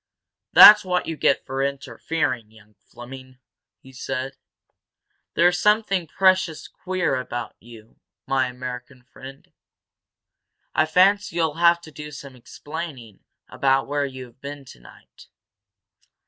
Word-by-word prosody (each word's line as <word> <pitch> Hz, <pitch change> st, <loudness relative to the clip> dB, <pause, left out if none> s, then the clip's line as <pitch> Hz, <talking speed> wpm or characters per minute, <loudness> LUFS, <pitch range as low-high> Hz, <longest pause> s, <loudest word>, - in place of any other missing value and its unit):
"That's 210 Hz, 0 st, +10 dB
what 180 Hz, -1 st, -1 dB
you 165 Hz, -, -4 dB
get 140 Hz, -, +1 dB
for 135 Hz, 0 st, -4 dB
interfering, 140 Hz, -3 st, -3 dB
young 110 Hz, -1 st, -21 dB
Fleming!" 130 Hz, +3 st, -13 dB, 0.4 s
he 130 Hz, -, -17 dB
said. 135 Hz, +1 st, -5 dB, 1.0 s
"There's 175 Hz, +2 st, +3 dB
something 210 Hz, -4 st, +1 dB
precious 185 Hz, -1 st, +1 dB
queer 185 Hz, -7 st, -2 dB
about 120 Hz, -1 st, -6 dB
you, 115 Hz, -1 st, -16 dB, 0.3 s
my 135 Hz, -1 st, 0 dB
American 125 Hz, 0 st, -8 dB
friend. 135 Hz, +1 st, -14 dB, 1.2 s
I 155 Hz, -, +2 dB
fancy 190 Hz, +3 st, +2 dB
you'll 160 Hz, -3 st, 0 dB
have 170 Hz, +1 st, +3 dB
to 160 Hz, -, -13 dB
do 150 Hz, 0 st, -9 dB
some 140 Hz, -2 st, -11 dB
explaining 135 Hz, -, -9 dB, 0.3 s
about 135 Hz, 0 st, +1 dB
where 145 Hz, 0 st, -1 dB
you've 130 Hz, -1 st, -12 dB
been 140 Hz, 0 st, -8 dB
tonight." -, -, -17 dB
140 Hz, 120 wpm, -23 LUFS, 130-170 Hz, 1.2 s, That's